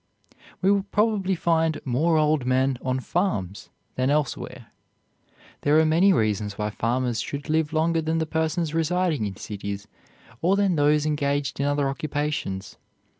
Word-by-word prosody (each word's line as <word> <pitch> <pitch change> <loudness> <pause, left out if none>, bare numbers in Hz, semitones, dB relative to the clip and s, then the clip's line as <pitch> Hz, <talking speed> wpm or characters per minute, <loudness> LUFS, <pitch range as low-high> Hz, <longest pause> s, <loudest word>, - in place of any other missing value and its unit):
We 195 - +5
will 200 -1 +3
probably 210 -3 +1
find 165 -2 +1
more 155 +6 +2
old 155 -2 +2
men 130 0 +1
on 130 0 -1
farms 105 - -2 0.2
than 130 +1 0
elsewhere. 145 -1 -2 0.9
There 145 +2 +3
are 160 - +4
many 170 +6 +4
reasons 105 - 0
why 105 0 -2
farmers 120 +1 -1
should 145 +2 -5
live 155 -1 +1
longer 165 +1 +1
than 160 +1 -1
persons 160 0 -1
residing 165 - 0
in 95 - -6
cities 100 0 -6 0.5
or 185 +4 +3
than 200 -3 +2
those 150 0 +3
engaged 145 -2 -1
in 140 - +1
other 145 -1 +1
occupations. 145 -9 -3
150 Hz, 145 wpm, -25 LUFS, 130-165 Hz, 0.9 s, We